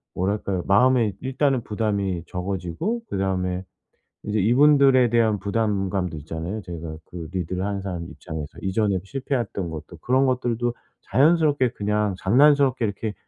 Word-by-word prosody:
뭐랄까요? 95 -1 -1
마음에 115 +1 +4
일단은 135 -1 0
부담이 100 -5 -1
적어지고 95 - -3
그다음에 95 -1 -1 0.6
이제 105 0 -1
이분들에 130 +2 +5
대한 110 -3 +3
부담감도 100 -5 -1
있잖아요 80 +7 -5
제가. 85 -4 -7
그 85 -3 -8
리드를 90 +1 -2
하는 100 -1 -2
사람 90 -3 -5
입장에서 80 -3 -8
이전에 95 0 +1
실패했던 120 -6 -3
것들 80 +1 -9
그런 130 +2 +2
것들도 120 -2 0 0.4
자연스럽게 145 - +3
그냥 105 -1 0
장난스럽게 130 +2 +4
이렇게 105 +1 -3
105 Hz, 360 characters per minute, -24 LUFS, 90-125 Hz, 0.6 s, 이분들에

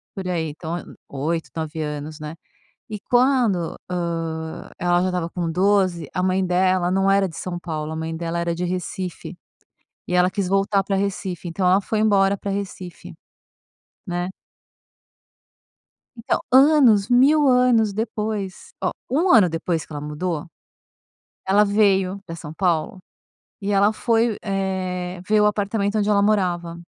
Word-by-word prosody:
por 190 -2 -5
aí. 165 -3 -1
Então, 160 +3 -5
eh, - - -7 0.2
8, 160 +4 -3
9 160 0 -4
anos, 150 +1 -5
né. 155 +1 -7 0.5
E 210 - -5
quando, 245 -9 +2
hã, 165 -2 -4
ela 175 0 +2
já 185 - +1
estava 180 -2 -2
com 170 -2 -3
12 185 -3 +1
a 180 - -1
mãe 185 0 +1
dela 180 0 +2
não 195 +1 +2
era 195 0 +3
de 165 - -10
São 180 -1 -4
Paulo, 155 -3 -4
a - - -5
mãe 160 0 -4
dela 170 +1 -3
era 170 0 -1
de 180 - -4
Recife, 180 0 -4 0.7
e 180 - -3
ela 180 0 +4
quis 190 -1 -2
voltar 195 +1 +2
pra 195 - -1
Recife. 190 -3 -3
Então 180 +2 -2
ela 190 +2 +5
foi 215 +2 -2
embora 200 -2 +3
para 200 +1 -4
Recife, 190 -3 -6 0.9
né. 175 0 -2 1.9
Então, 230 - -1
anos, 260 -7 +5
1000 280 +5 +5
anos 250 -4 +4
depois. 210 -2 -4
Ó, - - +1 0.2
1 315 +9 +2
ano 215 -7 +6
depois 165 0 -2
que - - -13
ela 145 - -5
mudou, 150 +2 -3 1.0
ela 205 +2 +4
veio 200 -2 +2
pra 165 -1 -7
São 155 -3 -8
Paulo 175 -1 0 0.6
e 200 +1 -2
ela 200 +1 +4
foi, 230 -1 +1
eh, 185 -2 -3
ver 215 0 +4
o - - +4
apartamento 205 0 0
onde 210 0 +1
ela 200 -1 +4
morava. 175 -5 0
185 Hz, 155 wpm, -22 LUFS, 170-205 Hz, 1.9 s, ano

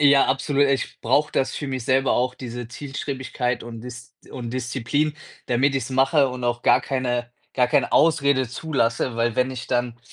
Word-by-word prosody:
Ja, 140 -1 +6
absolut. 140 +1 +2
Ich 135 -1 -1
brauche 140 +6 +2
das 135 - 0
für 145 - -4
mich 130 -3 -4
selber 130 +1 +2
auch, 125 +1 +1
diese 120 -2 -6
Zielstrebigkeit 130 -2 -4
und 115 -1 -8
Dis 125 +1 -10 0.2
und 120 -2 -6
Disziplin, 130 +4 -1 0.3
damit 135 +3 +2
ich's 135 -2 -2
mache 135 +2 +3
und 125 -1 -5
auch 120 0 -1
gar - - +5
keine 125 -3 -2 0.3
gar 125 -1 +3
keine 145 +1 +2
Ausrede 140 -4 +3
zulasse, 125 -3 -1
weil 115 0 +1
wenn 125 +2 +1
ich 130 0 -6
dann 120 -1 -1
130 Hz, 180 wpm, -23 LUFS, 120-140 Hz, 0.3 s, Ja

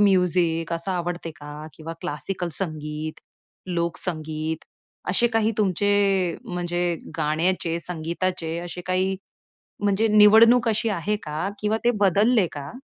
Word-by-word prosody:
Music 180 -4 +3
असं 170 +3 -3
आवडते 175 -1 -3
का? 150 +1 -9
किंवा 160 +2 -7
क्लासिकल 175 +4 -3
संगीत, 155 -2 -4 0.5
लोक 170 -2 -1
संगीत. 155 -2 -3 0.5
असे 215 +6 +3
काही 225 0 +3
तुमचे 205 0 +2 0.5
म्हणजे 175 -1 -1 0.2
गाण्याचे, 165 +2 0
संगीताचे 170 0 -3
असे 175 0 -6
काही. 185 +1 +1 0.7
म्हणजे 205 +2 +3
निवड 220 +3 +7
अशी 225 +1 0
आहे 205 +1 -1
का? 150 +5 -3
किंवा 210 +1 +1
ते 240 - +4
बदलले 205 +3 +4
का? 140 -1 -7
175 Hz, 120 wpm, -24 LUFS, 160-200 Hz, 0.7 s, निवड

